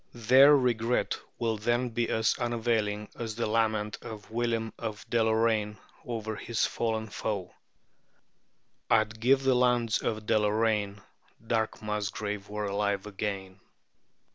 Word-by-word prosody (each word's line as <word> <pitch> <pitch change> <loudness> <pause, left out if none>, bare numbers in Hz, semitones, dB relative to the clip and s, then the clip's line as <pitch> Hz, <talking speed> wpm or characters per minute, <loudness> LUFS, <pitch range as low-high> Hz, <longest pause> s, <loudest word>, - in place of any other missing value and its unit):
Their 130 +5 +7
regret 120 -2 0 0.2
will 115 -2 -1
then 120 +3 0
be 120 0 -1
as 110 -1 +2
unavailing 110 -3 0
as 115 -2 -4
the 120 - -1
lament 110 -1 0
of 110 -1 -9
William 115 -1 -1
of 110 -3 -5
Deloraine 110 -2 +2 0.3
over 110 -3 -4
his 115 -1 0
fallen 110 -1 -1
foe 105 -3 -4 1.4
"I'd 110 0 +2
give 135 +4 +3
the 135 -1 +4
lands 125 -2 +2
of 110 -1 -2
Deloraine 105 -2 +1 0.4
Dark 110 -1 -1
Musgrave 105 -1 -3
were 105 0 -3
alive 100 0 -1
again." 100 -2 -5
110 Hz, 120 wpm, -29 LUFS, 105-115 Hz, 1.4 s, Their